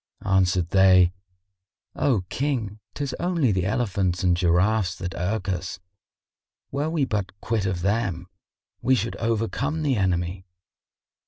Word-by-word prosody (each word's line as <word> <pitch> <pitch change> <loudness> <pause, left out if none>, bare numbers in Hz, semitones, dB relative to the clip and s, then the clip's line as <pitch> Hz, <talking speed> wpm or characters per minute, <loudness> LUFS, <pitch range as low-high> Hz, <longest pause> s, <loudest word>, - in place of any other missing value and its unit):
Answered 95 -3 +2
they, 95 -2 +6 0.8
"O 125 -9 +2
King, 120 -7 -2 0.2
'tis 140 -3 -3
only 170 -9 +1
the 95 -1 0
elephants 95 -5 0
and 90 -1 +4
giraffes 90 +2 +2
that 90 0 -5
irk 95 +3 -2
us; 90 -1 -3 0.9
were 145 +3 -1
we 160 -4 +1
but 100 -4 -3
quit 110 -4 -1
of 90 -2 -2
them, 100 -3 0 0.6
we 130 +2 +3
should 115 0 -2
overcome 115 +7 -1
the 135 -5 +1
enemy." 90 -1 -1
100 Hz, 130 wpm, -24 LUFS, 90-115 Hz, 0.9 s, they